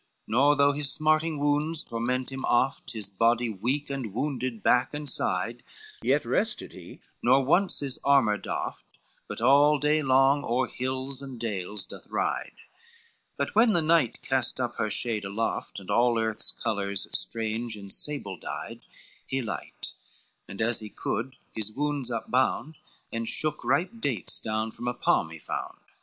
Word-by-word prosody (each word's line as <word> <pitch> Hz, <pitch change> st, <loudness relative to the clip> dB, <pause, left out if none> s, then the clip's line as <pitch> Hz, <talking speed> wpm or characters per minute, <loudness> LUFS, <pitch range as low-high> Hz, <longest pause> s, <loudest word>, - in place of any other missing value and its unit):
V -, -, -12 dB
Nor 140 Hz, +5 st, +5 dB
though 140 Hz, 0 st, +5 dB
his 145 Hz, -1 st, -2 dB
smarting 155 Hz, +1 st, +2 dB
wounds 150 Hz, +3 st, +1 dB
torment 125 Hz, +3 st, -2 dB
him 135 Hz, 0 st, -5 dB
oft, 120 Hz, +2 st, +1 dB
His 110 Hz, -4 st, -3 dB
body 115 Hz, +4 st, +2 dB
weak 130 Hz, +8 st, -2 dB
and 125 Hz, -7 st, -4 dB
wounded 130 Hz, -4 st, -2 dB
back 125 Hz, +4 st, +3 dB
and 150 Hz, 0 st, -5 dB
side, 115 Hz, -1 st, 0 dB, 0.4 s
Yet -, -, +2 dB
rested -, -, -1 dB
he, -, -, -12 dB, 0.2 s
nor 135 Hz, 0 st, +4 dB
once 180 Hz, +7 st, +3 dB
his 135 Hz, -3 st, -3 dB
armor 135 Hz, -7 st, +4 dB
doffed, -, -, -5 dB, 0.3 s
But -, -, -6 dB
all 145 Hz, +4 st, +6 dB
day 150 Hz, +2 st, +2 dB
long 135 Hz, +1 st, +4 dB
o'er 125 Hz, +2 st, +1 dB
hills 130 Hz, +2 st, -4 dB
and 135 Hz, -3 st, -8 dB
dales 105 Hz, -2 st, -4 dB
doth -, -, -12 dB
ride: -, -, -1 dB, 0.8 s
But -, -, -1 dB
when 225 Hz, +1 st, +5 dB
the 170 Hz, -, +3 dB
night 155 Hz, -7 st, +2 dB
cast 130 Hz, -1 st, 0 dB
up 120 Hz, -1 st, -2 dB
her 110 Hz, -, 0 dB
shade 110 Hz, 0 st, -1 dB
aloft 100 Hz, +2 st, -2 dB
And 95 Hz, +1 st, -7 dB
all 120 Hz, +2 st, +4 dB
earth's 110 Hz, -1 st, 0 dB
colors 100 Hz, -3 st, -2 dB
strange 115 Hz, 0 st, -1 dB
in 100 Hz, -1 st, -9 dB
sables 105 Hz, -, -1 dB
dyed, -, -, -6 dB, 0.5 s
He 135 Hz, -, -1 dB
light, 105 Hz, -4 st, -6 dB, 0.5 s
and 100 Hz, +3 st, -3 dB
as 115 Hz, +1 st, +1 dB
he 110 Hz, -1 st, -7 dB
could 125 Hz, +5 st, -3 dB, 0.2 s
his 110 Hz, -1 st, -4 dB
wounds 145 Hz, 0 st, -1 dB
upbound, 130 Hz, +5 st, 0 dB, 0.4 s
And 115 Hz, 0 st, -2 dB
shook 155 Hz, -1 st, -1 dB
ripe 180 Hz, +4 st, +2 dB
dates 130 Hz, -, -1 dB
down 110 Hz, 0 st, -2 dB
from 120 Hz, -, -7 dB
a 120 Hz, -, 0 dB
palm -, -, +2 dB
he -, -, -9 dB
found. -, -, -5 dB
125 Hz, 165 wpm, -28 LUFS, 110-145 Hz, 0.8 s, all